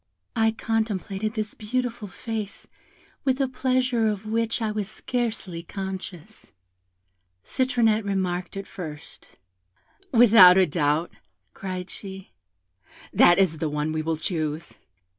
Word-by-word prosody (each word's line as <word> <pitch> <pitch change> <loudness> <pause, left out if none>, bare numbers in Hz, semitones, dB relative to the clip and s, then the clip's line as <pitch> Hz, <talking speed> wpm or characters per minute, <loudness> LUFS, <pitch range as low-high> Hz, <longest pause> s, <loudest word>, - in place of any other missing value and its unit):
"I 225 0 +4
contemplated 220 -1 -2
this 215 -1 -3
beautiful 240 0 -3
face 215 +1 -6 0.6
with 265 0 +1
a 270 - +2
pleasure 255 -2 +1
of 210 -1 -2
which 230 +2 0
I 220 -2 -1
was 210 -2 -3
scarcely 220 -7 -3
conscious. 190 +1 -7 0.9
Citronette 235 -4 +2
remarked 185 -2 -2
it 195 - -5
first. 155 -7 -9 0.8
'Without 220 -7 +8
a 190 - +6
doubt,' 155 0 0 0.4
cried 185 -1 -5
she, 190 - -9 0.8
'that 175 - +6
is 180 -5 +2
the 160 - -1
one 150 +1 -1
we 155 0 -1
will 160 0 -1
choose.' 155 -1 -3
200 Hz, 120 wpm, -25 LUFS, 180-225 Hz, 0.9 s, Without